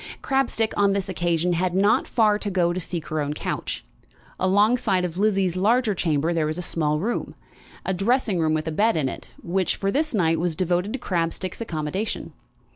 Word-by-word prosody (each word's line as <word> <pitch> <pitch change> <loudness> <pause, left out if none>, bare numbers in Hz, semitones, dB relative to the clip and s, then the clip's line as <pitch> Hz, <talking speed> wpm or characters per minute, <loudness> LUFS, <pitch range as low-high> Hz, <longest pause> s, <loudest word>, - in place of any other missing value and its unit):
Crabstick, 255 -5 +1
on 200 -1 +3
this 195 -1 -2
occasion, 175 -1 0
had 180 +1 0
not 200 +3 +3
far 215 -3 +3
to 210 - -3
go 175 -3 +1
to 185 - -2
seek 170 -2 -4
her 155 0 -1
own 145 +1 -2
couch. 60 - -4 0.5
Alongside 200 0 +3
of 175 +1 -5
Lizzie's 195 -4 +2
larger 220 +4 +2
chamber 165 -2 0
there 160 -2 +1
was 155 +2 -3
a 180 - -3
small 150 -3 0
room, 225 +8 -2 0.5
a 190 - 0
dressing 205 0 +1
room 155 -1 +2
with 155 +1 -2
a - - -1
bed 210 +4 +2
in 145 -4 +1
it, - - -7
which, 185 +1 0
for 195 0 -1
this 305 0 0
night, 165 -4 +2
was 170 -1 0
devoted 180 +3 0
to - - -1
Crabstick's 180 -2 -2
accommodation. 175 +1 -3
185 Hz, 195 wpm, -24 LUFS, 165-205 Hz, 0.5 s, on